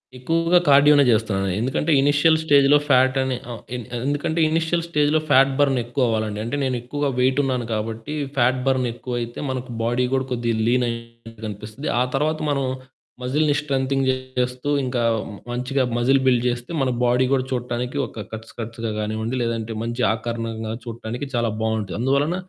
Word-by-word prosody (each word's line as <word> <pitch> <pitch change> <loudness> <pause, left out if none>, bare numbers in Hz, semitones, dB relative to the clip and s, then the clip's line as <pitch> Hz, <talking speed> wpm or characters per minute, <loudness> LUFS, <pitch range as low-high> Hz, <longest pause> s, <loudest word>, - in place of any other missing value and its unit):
ఎక్కువగా 165 +7 +2
కార్డియోనే 145 +1 +7
చేస్తున్నాను. 105 -4 +1
ఎందుకంటే 130 +6 0
ఇనీషియల్ 145 +3 +4
స్టేజ్‌లో 145 -1 +5
ఫ్యాట్ 130 0 +4
అని 130 -1 -1 0.2
ఆహ్, 115 - -7
ఎ - - -2 0.3
ఎందుకంటే 145 +3 -1
ఇనీషియల్ 165 +1 0
స్టేజ్‌లో 150 -1 +2
ప్యాట్ 135 +1 +5
బర్న్ 135 -3 +3
ఎక్కువవ్వాలండి. 110 -4 -1
అంటే 120 +5 -3
నేను 130 -1 0
ఎక్కువగా 145 +3 -2
వెయిట్ 130 +2 +2
ఉన్నాను 125 -3 -1
కాబట్టి 110 +6 -4 0.2
ప్యాట్ 125 +1 +3
బర్న్ 130 -2 +2
ఎక్కువైతే 120 -1 -5
మనకు 130 -1 -4
బాడీ 120 +2 +1
కూడా 130 -1 +1
కొద్దిగా 120 -2 0
లీన్‌గా 115 -2 -2
కనిపిస్తది. 105 +6 -6
ఆ - - +4
తరువాత 155 +3 0
మనం 140 -1 0 0.6
మజిల్‌ని 145 +3 +1
స్ట్రెంతెన్ 135 -1 0
చేస్తూ 130 0 -2 0.2
ఇంక 125 0 -2 0.5
మంచిగా 130 +2 0
మజిల్ 130 +3 +3
బిల్డ్ 125 -2 +3
చేస్తే 120 +4 -4
మన 130 - +1 0.2
బాడీ 125 +2 +3
కూడా 130 -1 +2
చూడటానికి 125 +1 -3
ఒక 110 -3 -8
కట్స్ 110 0 -8
కట్స్‌గా 115 0 -4
కానివ్వండి 110 +3 -2
లేదంటే 115 -1 -2
మంచి 120 +2 -3
ఆకారణంగా 115 -1 -4
చూడటానికి 115 +2 -5
చాలా 120 -1 +1
బావుంటది. 110 -3 -1
అందువలన 140 +6 +1
125 Hz, 150 wpm, -22 LUFS, 115-140 Hz, 0.6 s, కార్డియోనే